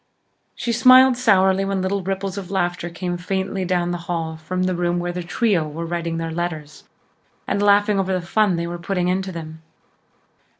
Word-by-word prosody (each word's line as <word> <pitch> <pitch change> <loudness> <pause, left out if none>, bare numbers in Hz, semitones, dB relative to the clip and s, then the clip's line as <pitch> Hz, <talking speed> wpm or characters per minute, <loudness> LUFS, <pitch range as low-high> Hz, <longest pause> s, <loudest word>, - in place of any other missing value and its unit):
She 235 - -2
smiled 255 +2 +7
sourly 195 -5 +3
when 195 -1 -1
little 195 +1 -1
ripples 195 0 -3
of 195 -3 -6
laughter 175 -2 -1
came 175 +1 -4
faintly 190 +1 -2
down 175 -1 0
the 175 - -3
hall 165 -2 -2
from 180 +4 -3
the 185 - +1
front 175 - -5
room 175 0 0
where 175 0 -2
The 180 0 -4
Trio 175 -2 0
were 160 +3 -5
writing 170 -1 -3
their 165 0 -3
letters 160 -3 -5 0.6
and 200 - -1
laughing 205 0 +4
over 190 0 -1
the 180 -2 -1
fun 205 0 +2
they 170 0 -2
were 175 0 -5
putting 180 0 -1
into 190 +1 -1
them. 160 -2 -8
180 Hz, 195 wpm, -21 LUFS, 170-195 Hz, 0.6 s, smiled